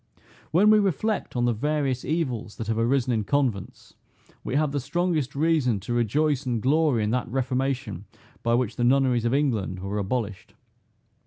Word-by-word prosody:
When 200 +6 +5
we 215 - +6
reflect 200 0 -1
on 120 0 +1
the 120 - +2
various 135 +1 -1
evils 130 -8 -2
that 115 - -5
have 110 0 -1
arisen 125 +1 +1
in 110 -2 0
convents, 120 -6 -2 0.5
we 130 - -3
have 150 -1 +2
the 145 - -1
strongest 150 0 -1
reason 145 -8 +2
to 120 +5 -4
rejoice 140 +5 +1
and 120 -3 -1
glory 140 -1 +2
in 105 - 0
that 125 +1 -1
reformation 130 -5 -2 0.4
by 115 0 +2
which 120 -2 -1
the 120 - 0
nunneries 125 -2 +3
of 120 - +1
England 115 -10 0
were 95 +3 -3
abolished. 105 0 -4
130 Hz, 170 wpm, -25 LUFS, 115-145 Hz, 0.5 s, we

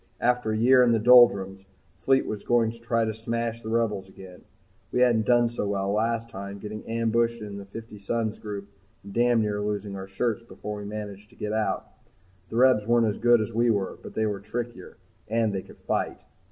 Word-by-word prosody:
After 125 -2 +1
a 110 - 0
year 125 +3 +6
in 120 -2 +4
the - - +4
doldrums, 105 -5 +5 0.4
Fleet 135 +5 +2
was 105 -2 -4
going 120 -2 +2
to 115 - -14
try 115 -1 0
to 110 - -2
smash 115 +1 -3
the 110 - -6
Rebels 105 -4 -1
again. 95 -1 -13 0.5
We 125 - +1
hadn't 115 -4 +3
done 120 -1 +4
so 115 -3 -3
well 100 -1 -1
last 115 +2 0
time, 100 -2 -7
getting 105 +1 -7
ambushed 115 +1 +1
in 100 -1 -7
the 100 - -9
Fifty 110 +1 -10
Suns 110 +2 -2
group 100 -2 -6 0.4
and 100 - -10
damn 120 -1 +3
near 105 -1 -1
losing 105 -1 -3
our 95 0 -7
shirts 115 +4 -1
before 105 -2 -7
we 100 - -7
managed 105 -1 -7
to 120 - -21
get 105 0 -4
out. 110 -1 -1 0.6
The - - -7
Rebs 125 -4 +4
weren't 120 0 +4
as 105 -2 -1
good 120 -1 +5
as 110 +2 -4
we 120 +2 +2
were, 100 -4 -1
but - - -11
they 110 - +1
were 105 -2 -2
trickier, 115 -1 -6 0.3
and 110 -1 +1
they 95 - -2
could - - -16
fight. - - -2
110 Hz, 210 wpm, -26 LUFS, 105-115 Hz, 0.6 s, year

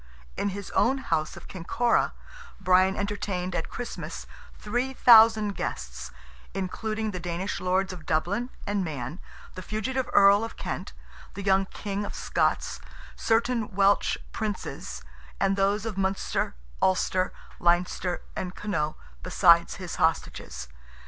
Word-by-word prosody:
In 205 - 0
his 200 0 -6
own 270 - +3
house 160 -12 -1
of - - -11
Kinkora, 230 +7 +1 0.5
Brian 185 0 +4
entertained 200 -3 -2
at 165 - -2
Christmas 245 - -6 0.3
3,000 225 -2 +5
guests, 65 0 -5 0.5
including 215 +3 -2
the 185 - -5
Danish 175 +3 -3
Lords 185 +1 +1
of 165 -4 -11
Dublin 180 +10 0 0.2
and 200 -1 0
Man, 150 0 -5 0.3
the 185 - -7
fugitive 230 +7 -2
Earl 200 +1 +6
of 225 - -6
Kent, - - -5 0.4
the 200 - -5
young 195 0 +3
King 205 0 -4
of 205 - -6
Scots, - - 0 0.4
certain 225 -2 +1
Welsh 200 +1 +3
Princes, 205 - -4 0.4
and 195 0 +2
those 200 +2 +1
of 210 -4 -3
Munster, 190 - -1 0.3
Ulster, 185 0 +2 0.3
Leinster 175 +1 +1
and 180 0 -4
Connaught, 155 -7 -2 0.3
beside 170 -2 +5
his 185 -3 -6
hostages. 65 - -1
195 Hz, 125 wpm, -27 LUFS, 180-210 Hz, 0.5 s, Earl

